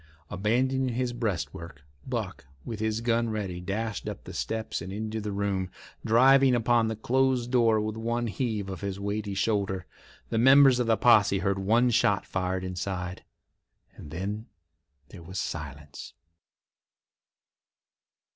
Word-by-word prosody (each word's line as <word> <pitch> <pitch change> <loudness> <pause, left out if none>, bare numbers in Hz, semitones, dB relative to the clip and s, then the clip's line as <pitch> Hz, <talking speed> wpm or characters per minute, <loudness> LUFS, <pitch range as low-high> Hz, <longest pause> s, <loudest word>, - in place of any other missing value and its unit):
Abandoning 125 +5 0
his 125 -1 -1
breastwork, 85 - -4 0.2
Buck, 110 - -4 0.2
with 110 -2 -5
his 110 +1 -1
gun 115 0 +1
ready, 100 -5 -3
dashed 105 +3 -3
up - - -8
the - - -9
steps 110 -5 -3
and 90 +3 -6
into 110 +2 -4
the 105 0 -4
room, 100 -2 -1 0.3
driving 130 +3 +5
upon 120 -1 +2
the 110 - -2
closed 125 +2 +1
door 115 -3 +4
with 110 0 -2
one 120 +1 -2
heave 110 -1 -2
of 95 -2 -6
his 100 -1 -4
weighty 100 0 -3
shoulder. 100 -3 0 0.4
The 115 - 0
members 135 +1 +7
of 120 - 0
the 115 -1 +3
posse 105 -5 +5
heard 95 +1 0
one 115 +6 +3
shot 105 -3 +2
fired 95 0 -2
inside, 90 0 -4 0.7
and 75 - -11
then 100 +7 -4 0.6
there 90 - -11
was 90 +3 -6
silence. 75 -2 -6
110 Hz, 140 wpm, -27 LUFS, 95-120 Hz, 0.7 s, members